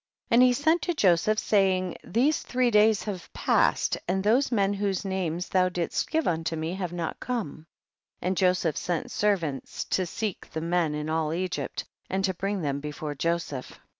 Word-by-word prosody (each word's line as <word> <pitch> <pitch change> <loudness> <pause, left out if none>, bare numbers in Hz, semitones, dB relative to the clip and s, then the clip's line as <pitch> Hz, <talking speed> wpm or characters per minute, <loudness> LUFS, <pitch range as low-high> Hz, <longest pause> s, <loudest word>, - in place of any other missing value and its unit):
15. 230 - +3
And 240 - +7
he - - +4
sent 315 +6 +2
to 350 - -1
Joseph, 195 - +3
saying, 190 -4 +2
these 270 +7 +2
three 250 -1 +1
days 210 -2 +4
have 190 -5 -6
passed, - - +2
and 190 +2 0
those 245 +7 +3
men 200 -3 +2
whose 200 -1 -1
names 180 -3 -2
thou 185 -1 +3
didst 175 -1 -2
give 320 -1 0
unto 165 -1 -1
me 160 +2 -3
have 185 -2 -3
not 170 -2 -4
come; 210 - -4 0.5
and 185 +1 -1
Joseph 180 -4 +2
sent 175 -3 -2
servants 170 -10 -1
to 185 -2 -1
seek 210 +2 -4
the 160 - -2
men 165 -2 +1
in 150 0 -3
all 160 -1 0
Egypt, 185 0 -3 0.2
and 190 +1 0
to 190 - 0
bring 195 +1 -2
them 140 -1 -1
before 150 0 -5
Joseph. 155 -3 -3
185 Hz, 180 wpm, -27 LUFS, 165-210 Hz, 0.5 s, And